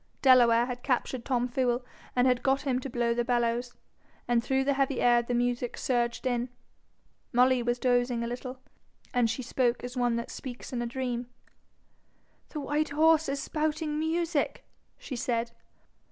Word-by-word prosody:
Delaware 240 -3 +6
had 245 0 -5
captured 255 -1 -1
Tom 245 -2 +1
Fool 245 0 0 0.3
and 250 -1 +3
got 270 +1 +2
him 260 -3 0
to 270 - -6
blow 240 -1 0
the 240 0 0
bellows, 240 0 0 0.5
and 235 -1 +2
through 265 +1 +1
the 280 +1 +2
heavy 275 -1 0
air 240 -1 +5
the 240 +1 -2
music 245 0 -1
surged 240 -1 -1
in. 245 -1 0 0.8
Molly 250 +1 +4
was 240 +1 0
dozing 245 -1 +1
a - - -2
little, 250 +2 -6 0.6
and 245 -3 +3
she 255 +3 -3
spoke 245 0 0
as 245 +1 -6
one 245 -2 +1
that 235 0 -4
speaks 250 0 -8
in 240 - -1
a 240 - -2
dream. 245 -1 -3 1.2
'The 305 - -5
white 295 +2 0
horse 315 +1 +4
is 280 0 -2
spouting 305 0 -1
music,' 325 -1 -1 0.3
she 265 - -7
said. 235 -1 -1
245 Hz, 165 wpm, -29 LUFS, 240-270 Hz, 1.2 s, Delaware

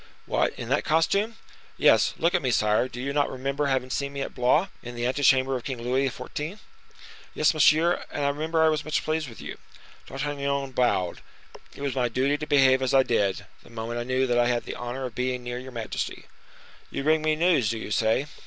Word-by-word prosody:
"What, - - 0
in - - -6
that - - +1
costume?" 200 +8 +1 0.4
"Yes; - - +4
look 170 +2 +1
at - - +2
me, 130 - 0
sire; 105 0 +2
do 125 - -9
you 140 +2 -3
not 145 0 +1
remember 135 +2 -2
having 130 -2 -1
seen 140 0 -2
me 140 - -4
at - - -4
Blois, 135 +9 +2
in 120 0 -8
the 120 0 -2
ante 130 +3 -1
chamber 135 -1 +4
of 125 - -4
King 130 -2 -4
Louis 130 +3 0
XIV.?" 150 +8 -6 0.8
"Yes, 155 - +3
monsieur, 155 +3 +4
and 145 - -2
I - - +3
remember 160 +3 0
I 160 - +5
was 155 -1 0
much 155 - -1
pleased 155 -3 -1
with 115 - -13
you." - - -8 0.5
D'Artagnan 140 -1 -2
bowed. 120 -9 0 0.5
"It 140 - -8
was 140 -2 -1
my 125 -2 0
duty 130 +4 +1
to 150 - -5
behave 135 -2 +4
as 130 +1 +1
I 135 - +6
did, 100 -6 0 0.2
the - - -18
moment 115 +1 -5
I - - -2
knew 130 +2 +1
that 120 -1 +1
I 120 - +3
had 120 -1 0
the - - -6
honor 125 +2 -5
of 125 - -6
being 125 0 -2
near 120 0 -4
your 130 +1 -9
majesty." 115 -3 -4 0.6
"You - - -4
bring 155 +1 +3
me 155 0 +1
news, 160 - +2
do 115 - -2
you 110 - -7
say?" 110 +6 +2
130 Hz, 225 wpm, -26 LUFS, 125-150 Hz, 0.8 s, I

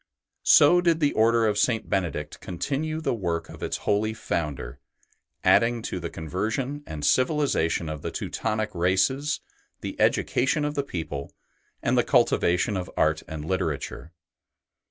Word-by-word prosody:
So 175 +5 +7
did 170 -2 +2
the 145 -3 +2
Order 115 +1 +3
of 105 -1 +1
St. 115 -2 +1
Benedict 90 -6 -2
continue 145 - -3
the 160 - 0
work 85 -7 -2
of - - -11
its - - -2
holy 110 +1 +1
Founder, 70 - -3 0.6
adding 115 0 +4
to 90 - -3
the 85 -1 -4
conversion 110 - -3
and 75 -2 -4
civilization 130 - +2
of 75 -2 -5
the - - -3
Teutonic 110 0 -2
races 95 - +1 0.4
the - - -5
education 145 +4 +2
of 150 - -1
the 145 - 0
people 80 - -5 0.5
and - - +2
the - - +4
cultivation 90 +4 +2
of 90 -2 -4
art 80 0 +2
and 80 -1 -6
literature. 80 -3 -3
105 Hz, 145 wpm, -26 LUFS, 85-135 Hz, 0.6 s, So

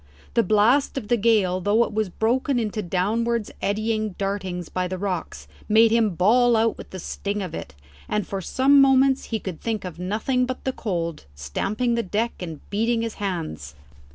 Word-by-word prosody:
The 235 - +4
blast 230 +7 +3
of 220 -6 -5
the 240 - +4
gale 205 -5 +2
though 210 +5 +3
it 220 - -5
was 215 -2 0
broken 245 +7 0
into 220 -2 -1
downwards 215 +5 -1
eddying 215 0 -1
dartings 190 -3 -3
by 180 0 -2
the 185 +1 -4
rocks, 185 -3 -4 0.2
made 220 +1 +6
him 225 -5 +2
bawl 235 +7 +4
out 225 0 +2
with - - -11
the 190 - -7
sting 200 +3 -4
of 180 -4 -6
it, - - -7 0.3
and 210 -1 0
for 195 -1 -4
some 275 +9 +4
moments 270 0 +4
he 225 - -2
could 185 -6 -7
think 220 -4 -2
of 175 -2 -7
nothing 225 +7 0
but 255 0 -5
the 265 - -1
cold, 170 - -3
stamping 200 - -1
the 235 - +1
deck, 220 +4 -1
and 165 -5 -8
beating 225 +3 +1
his 230 -1 -3
hands. 155 - -4
215 Hz, 185 wpm, -24 LUFS, 185-235 Hz, 0.3 s, made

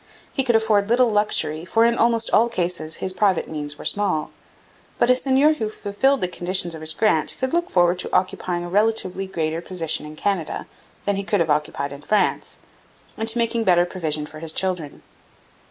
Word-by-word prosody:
He 270 - 0
could 240 -3 +2
afford 215 -2 +2
little 245 +1 +4
luxury, 165 -7 0
for 225 +6 +2
in 235 0 +3
almost 230 -1 +1
all 235 +2 +4
cases 170 -5 -1
his 185 - -3
private 190 -1 +1
means 150 -2 -4
were - - -10
small. 195 -7 0 0.7
But 250 - +4
a - - +5
seigneur 275 +4 +3
who 220 -8 -3
fulfilled 220 +6 0
the 180 - +1
conditions 175 -1 0
of 160 - -8
his 155 0 -1
grant 215 -8 +2
could 260 +2 -2
look 345 +1 +1
forward 175 0 +2
to - - -2
occupying 180 -1 -1
a 175 - -6
relatively 195 -1 +1
greater 165 -3 -2
position 165 -4 -2
in 155 - -10
Canada 185 -1 -2 0.4
than 205 -1 0
he 200 - -2
could 205 0 0
have 165 -2 +1
occupied 145 -1 -1
in 140 - -10
France, 210 +7 0 0.6
and 220 +1 0
to 225 - -1
making 230 0 0
better 175 -3 +4
provision 155 -4 -2
for 155 +1 -11
his 160 0 0
children. 180 -6 -2
185 Hz, 195 wpm, -22 LUFS, 165-225 Hz, 0.7 s, a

